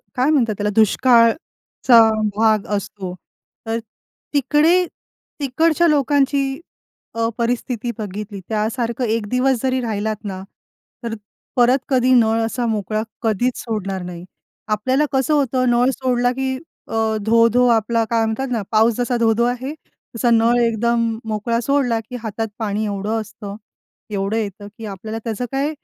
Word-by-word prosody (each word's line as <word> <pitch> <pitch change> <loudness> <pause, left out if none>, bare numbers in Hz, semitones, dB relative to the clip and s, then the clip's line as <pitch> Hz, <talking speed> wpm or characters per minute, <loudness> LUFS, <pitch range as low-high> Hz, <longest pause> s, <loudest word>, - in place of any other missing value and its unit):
काय 255 +3 +2
म्हणतात 235 -9 +2
त्याला 210 0 0
दुष्काळचा 230 +2 +3 0.4
भाग 215 -1 +3
असतो. 190 -2 -6 0.5
तर 225 +1 -1 0.5
तिकडे 300 +6 +3 0.5
तिकडच्या 320 +5 +2
लोकांची, 280 -1 +1 0.5
अ, 230 0 0
परिस्थिती 240 0 -1
बघितली 205 -1 -6
त्यासारखं 230 +3 -1
1 220 -2 -1
दिवस 250 0 +1
जरी 260 0 +1
राहिलात 215 -1 -2
ना, 190 -3 -5 0.6
तर 230 - -3 0.4
परत 250 +2 +5
कधी 255 -1 +3
नळ 225 -2 +4
असा 240 +1 -2
मोकळा 215 -1 -1 0.2
कधीच 235 +2 0
सोडणार 195 -5 -3
नाही. 175 -1 -7 0.4
आपल्याला 255 +8 +1
कसं 265 +2 +1
होतं, 260 -3 +1
नळ 240 +2 +3
सोडला 245 -1 +1
की 265 0 -2 0.3
अ, - - -8 0.3
धो-धो 230 +2 +4
आपला 230 0 +2
काय 230 -1 +2
म्हणतात 220 +5 -2
ना, 230 -3 0
पाऊस 220 +1 +4
जसा 245 0 0
धो-धो 230 0 +2
आहे. 250 +4 -2 0.4
तसा 240 +1 +1
नळ 230 +1 +4
एकदम 235 +1 +1 0.3
मोकळा 220 +2 -1
सोडला, 250 -3 +1
की 225 +3 -9
हातात 225 0 -3
पाणी 215 0 -1
एवढं 205 +2 -2
असतं, 205 -1 -9 0.5
एवढं 200 +1 -2
येतं, 205 -1 -4
की 225 - -7
आपल्याला 215 +2 -6
त्याचं 230 +2 -3
काय 275 +2 0
230 Hz, 140 wpm, -20 LUFS, 215-255 Hz, 0.6 s, परत